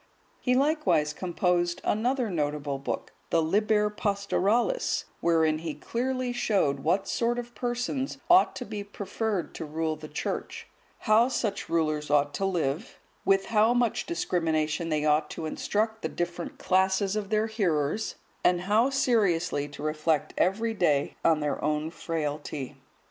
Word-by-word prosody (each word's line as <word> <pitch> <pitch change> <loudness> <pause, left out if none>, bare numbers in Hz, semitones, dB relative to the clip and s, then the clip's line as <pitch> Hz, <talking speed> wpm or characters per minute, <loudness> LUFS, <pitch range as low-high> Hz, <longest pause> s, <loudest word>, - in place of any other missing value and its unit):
He 250 -1 +1
likewise 275 - +2
composed 175 0 0
another 240 +1 0
notable 145 -3 -2
book, 135 - -4 0.2
the 165 - +3
"Liber 210 +5 +2
Pastoralis," 210 - 0 0.2
wherein 160 -2 +2
he 160 -2 -4
clearly 255 +1 -2
showed 195 - +1
what 175 +7 +1
sort 240 +1 0
of 240 0 -5
persons 245 +4 -2
ought 360 +2 +5
to 250 - -5
be 210 -2 -5
preferred 200 -1 -3
to - - -6
rule 160 +1 -2
the 155 0 -9
Church; 150 - -4 0.4
how 220 +3 +5
such 220 -4 -2
rulers 155 -3 0
ought 145 0 +3
to 195 - -1
live; 175 - -2 0.3
with 195 0 +3
how 225 +2 +3
much 240 -2 +1
discrimination 165 - 0
they 155 -1 0
ought 150 0 +2
to 160 - -5
instruct 220 +7 -1
the - - -2
different 175 0 -4
classes 190 +2 +2
of 210 -2 -3
their 215 0 +2
hearers, 195 -4 0 0.3
and 180 -1 +3
how 215 +7 +3
seriously 195 - +1
to 145 0 -10
reflect 155 0 0
every 220 +5 +1
day 150 -9 +1
on 160 -2 +3
their 150 -1 -2
own 150 +1 0
frailty. 150 -4 -4
185 Hz, 145 wpm, -28 LUFS, 155-220 Hz, 0.4 s, ought